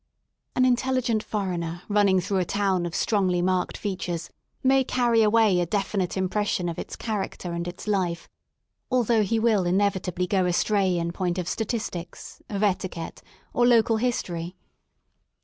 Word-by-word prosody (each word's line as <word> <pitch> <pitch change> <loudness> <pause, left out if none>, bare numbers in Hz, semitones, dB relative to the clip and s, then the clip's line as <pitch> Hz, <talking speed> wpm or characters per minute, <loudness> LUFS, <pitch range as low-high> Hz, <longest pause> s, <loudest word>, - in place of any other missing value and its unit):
An 255 - +4
intelligent 250 -3 +1
foreigner 175 -5 -3
running 205 -2 +3
through 190 +2 -1
a - - +2
town 190 -3 0
of 165 - -6
strongly 190 -5 +1
marked 180 0 0
features 180 -4 -4 0.3
may 265 0 +4
carry 240 -3 +2
away 215 -3 +4
a 175 - 0
definite 195 -1 -1
impression 190 -1 0
of 170 - -4
its - - -6
character 195 -5 -4
and 170 0 -3
its 175 - -7
life, 180 -5 -1 0.6
although 240 -3 +3
he 225 +2 +1
will 220 -4 +3
inevitably 180 -1 0
go 185 -1 +1
astray 190 +1 +2
in 170 0 -1
point 180 0 -2
of 180 -2 -3
statistics, 205 -6 -4
of 205 -1 -2
etiquette, 185 -4 -2 0.3
or 240 0 +3
local 230 -1 +4
history. 180 -7 -2
195 Hz, 150 wpm, -25 LUFS, 180-220 Hz, 0.6 s, An